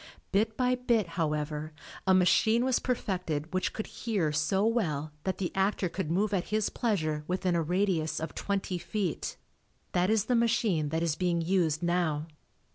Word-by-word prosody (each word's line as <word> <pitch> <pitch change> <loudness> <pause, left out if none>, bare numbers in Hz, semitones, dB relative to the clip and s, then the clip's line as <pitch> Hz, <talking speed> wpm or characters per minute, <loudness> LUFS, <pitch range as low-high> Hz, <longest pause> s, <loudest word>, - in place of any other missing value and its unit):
Bit 220 +2 +1
by 250 0 +2
bit, 235 -6 +1
however, 155 -2 -2 0.3
a 190 - +6
machine 220 +6 +4
was 260 -2 +2
perfected 180 - -2
which 185 - 0
could 220 - -4
"hear" 200 -10 -1
so 160 +7 +1
well 155 -11 0
that 190 -1 -1
the 180 -3 -2
actor 195 -1 +1
could 165 -1 -3
move 200 +5 +1
at 185 -3 +1
his 215 0 0
pleasure 155 -10 -1
within 180 -1 0
a 170 - +2
radius 170 -2 0
of 160 -1 -5
twenty 195 -2 -2
feet. 195 -3 -3 0.5
That 180 +2 +2
is 215 -2 +2
the 250 - +1
machine 225 -9 +2
that 160 +2 -1
is 165 -3 +1
being 175 -1 +1
used 165 -3 +1
now. 170 -4 +1
180 Hz, 170 wpm, -29 LUFS, 160-210 Hz, 0.5 s, a